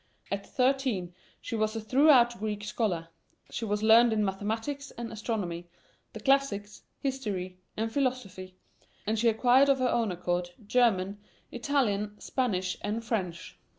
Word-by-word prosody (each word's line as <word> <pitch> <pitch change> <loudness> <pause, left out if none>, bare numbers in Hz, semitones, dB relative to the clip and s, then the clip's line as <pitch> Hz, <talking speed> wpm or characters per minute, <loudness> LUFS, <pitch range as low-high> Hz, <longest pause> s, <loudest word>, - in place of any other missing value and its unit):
At 200 0 -3
thirteen 255 -9 0 0.3
she 230 - -4
was 215 0 0
a - - -1
thorough 260 +3 +6
Greek 210 -1 -3
scholar; 205 -6 -2 0.4
she 230 - -3
was 210 0 -1
learned 230 +2 +7
in 215 -1 +2
mathematics 225 +9 -3
and 235 0 -7
astronomy, 195 -6 -3 0.5
the 220 - -7
classics, 215 -5 +1 0.2
history, 200 -10 -3 0.2
and 225 +1 -1
philosophy; 225 -9 -2 0.5
and 220 +1 0
she 235 +1 +4
acquired 250 +5 +4
of 275 - +5
her 255 -1 +1
own 230 -4 +1
accord 175 0 -2
German, 205 -4 +2 0.3
Italian, 210 -6 0
Spanish, 190 -8 -1
and 225 +2 -3
French. 185 -8 -3
220 Hz, 140 wpm, -29 LUFS, 195-250 Hz, 0.5 s, learned